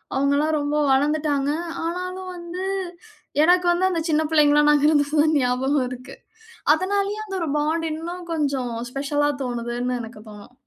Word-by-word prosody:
அவுங்கல்லாம் 285 Hz, +3 st, +2 dB
ரொம்ப 290 Hz, +1 st, -1 dB, 0.2 s
வளந்துட்டாங்க. 290 Hz, 0 st, +1 dB, 0.4 s
ஆனாலும் 365 Hz, +2 st, -4 dB
வந்து 345 Hz, +2 st, -6 dB, 0.8 s
எனக்கு 355 Hz, +2 st, +4 dB
வந்து 365 Hz, +2 st, +2 dB
அந்த 335 Hz, -, -1 dB
சின்ன 310 Hz, 0 st, +3 dB
பிள்ளைங்களா 295 Hz, -1 st, +5 dB
நாங்க 295 Hz, 0 st, +4 dB
இருந்தது 290 Hz, 0 st, +2 dB
தான் 310 Hz, 0 st, +2 dB
ஞாபகம் 260 Hz, +2 st, +1 dB
இருக்கு. 250 Hz, 0 st, -9 dB, 0.6 s
அதுனாலேயே 400 Hz, +4 st, -1 dB
அந்த 390 Hz, -2 st, -6 dB
ஒரு 330 Hz, -, -1 dB
பாண்ட் 320 Hz, +2 st, 0 dB
இன்னும் 345 Hz, +3 st, -6 dB
கொஞ்சம் 275 Hz, -6 st, -1 dB, 0.2 s
ஸ்பெஷலா 290 Hz, +2 st, 0 dB
தோணுதுன்னு 245 Hz, 0 st, -3 dB
எனக்கு 225 Hz, -1 st, -10 dB
தோணும். 210 Hz, +3 st, -13 dB
295 Hz, 140 wpm, -23 LUFS, 270-340 Hz, 0.8 s, பிள்ளைங்களா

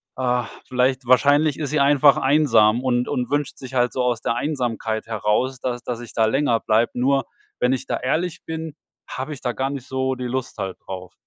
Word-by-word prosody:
ah, 125 Hz, -2 st, 0 dB, 0.2 s
vielleicht 130 Hz, 0 st, 0 dB
wahrscheinlich 145 Hz, +3 st, +4 dB
ist 145 Hz, -2 st, -3 dB
sie 150 Hz, -, +1 dB
einfach 140 Hz, 0 st, +5 dB
einsam 125 Hz, -5 st, +4 dB
und 125 Hz, -1 st, +1 dB
und 125 Hz, -4 st, -2 dB
wünscht 145 Hz, -1 st, -1 dB
sich 130 Hz, -1 st, -10 dB
halt 125 Hz, -1 st, +2 dB
so 130 Hz, -, -1 dB
aus 120 Hz, -2 st, 0 dB
der 115 Hz, -, -1 dB
Einsamkeit 120 Hz, -6 st, -2 dB
heraus, 115 Hz, +4 st, 0 dB
dass 125 Hz, -1 st, -3 dB
dass 120 Hz, -2 st, -4 dB
ich 120 Hz, -, -10 dB
da 115 Hz, -, +3 dB
länger 120 Hz, 0 st, +2 dB
bleibe.“ 110 Hz, +2 st, +2 dB
Nur 135 Hz, +2 st, +2 dB, 0.3 s
wenn 125 Hz, +1 st, +2 dB
ich 130 Hz, -, -3 dB
da -, -, -1 dB
ehrlich 160 Hz, +7 st, -2 dB
bin, 160 Hz, -1 st, -5 dB, 0.3 s
habe 135 Hz, +4 st, -5 dB
ich 140 Hz, -, -10 dB
da 125 Hz, -, -1 dB
gar 135 Hz, +2 st, -1 dB
nicht 135 Hz, -3 st, -6 dB
so 130 Hz, 0 st, -1 dB
die 125 Hz, 0 st, -5 dB
Lust 130 Hz, +1 st, -4 dB
halt 95 Hz, -1 st, -4 dB
drauf. 95 Hz, -1 st, -7 dB
130 Hz, 210 wpm, -22 LUFS, 120-140 Hz, 0.3 s, einfach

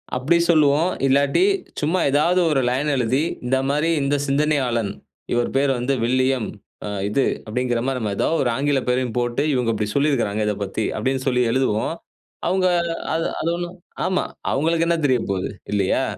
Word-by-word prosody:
அப்டி 135 Hz, +7 st, +2 dB
சொல்லுவோம். 155 Hz, +1 st, +4 dB, 0.2 s
இல்லாட்டி 140 Hz, -, +3 dB, 0.4 s
சும்மா 160 Hz, +5 st, +1 dB
ஏதாவது 160 Hz, +6 st, +3 dB
ஒரு 135 Hz, -3 st, +2 dB
லைன் 135 Hz, +4 st, 0 dB
எழுதி, 130 Hz, +3 st, +1 dB, 0.2 s
இந்த 130 Hz, +2 st, +2 dB
மாரி 150 Hz, +4 st, +1 dB
இந்த 140 Hz, +1 st, +1 dB
சிந்தனையாளன். 135 Hz, -7 st, +1 dB, 0.4 s
இவரு 120 Hz, 0 st, +1 dB
பேரு 140 Hz, 0 st, +3 dB
வந்து 125 Hz, +3 st, 0 dB
வில்லியம், 130 Hz, -1 st, +1 dB, 0.4 s
அ, -, -, -4 dB, 0.2 s
இது, 130 Hz, +6 st, +1 dB, 0.2 s
அப்டிங்கற 120 Hz, +1 st, -1 dB
மாரி, 135 Hz, -1 st, -1 dB
நம்ம 105 Hz, -3 st, -2 dB
ஏதாவது 165 Hz, -, +1 dB
ஒரு 125 Hz, -, +1 dB
ஆங்கில 140 Hz, +1 st, +1 dB
பேரையும் 125 Hz, -1 st, 0 dB
போட்டு 120 Hz, +3 st, 0 dB
இவங்க 120 Hz, -3 st, +1 dB
இப்டி 105 Hz, 0 st, -1 dB
சொல்லிருக்காங்க, 130 Hz, -8 st, +1 dB
இதப்பத்தி 105 Hz, +1 st, -2 dB
அப்டின்னு 130 Hz, +3 st, -1 dB
சொல்லி 125 Hz, -1 st, +2 dB
எழுதுவோம். 130 Hz, +3 st, 0 dB, 0.5 s
அவுங்க 185 Hz, 0 st, +2 dB, 0.5 s
அது 165 Hz, +1 st, 0 dB
அது 165 Hz, -, -1 dB
ஒண்ணும் 175 Hz, +1 st, -6 dB, 0.3 s
ஆமா, 185 Hz, -, +1 dB, 0.3 s
அவங்களுக்கு 165 Hz, +4 st, +1 dB
என்ன 170 Hz, 0 st, +2 dB
தெரியப்போகுது? 105 Hz, -8 st, 0 dB, 0.2 s
இல்லையா? 100 Hz, -2 st, +1 dB
135 Hz, 155 wpm, -22 LUFS, 120-150 Hz, 0.5 s, சொல்லுவோம்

